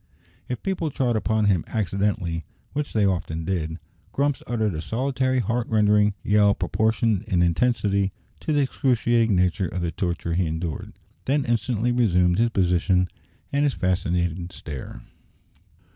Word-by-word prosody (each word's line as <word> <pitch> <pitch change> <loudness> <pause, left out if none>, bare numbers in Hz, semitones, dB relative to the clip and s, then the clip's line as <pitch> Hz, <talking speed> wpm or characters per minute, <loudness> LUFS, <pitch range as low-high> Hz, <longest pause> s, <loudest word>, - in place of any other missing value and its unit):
If 125 - -4
people 185 -5 -1
trod 125 -4 0
upon 110 0 +1
him 95 -5 +3
accidentally, 100 -5 -1 0.3
which 145 +1 -2
they 105 -2 +2
often 85 -4 -1
did, 80 -3 -2 0.4
Grumps 140 0 0
uttered 110 -4 0
a 80 - -3
solitary 130 - 0
heart 120 -1 0
rending 105 -1 +3
yell 105 -1 +4
proportioned 110 -2 +1
in 90 -4 +2
intensity 100 +1 +1 0.3
to - - -3
the 145 -1 +3
excruciating 120 -5 +2
nature 90 +1 +1
of 90 - -4
the 85 -1 -1
torture 85 0 -2
he 90 0 +1
endured, 80 -1 -4 0.3
then 140 +1 +1
instantly 120 0 0
resumed 90 -7 +3
his 120 +1 +3
position 90 -2 +2 0.4
and 140 +1 +2
his 145 -2 +1
fascinated 90 -1 -1
stare. 70 -7 -8
105 Hz, 145 wpm, -24 LUFS, 90-120 Hz, 0.4 s, yell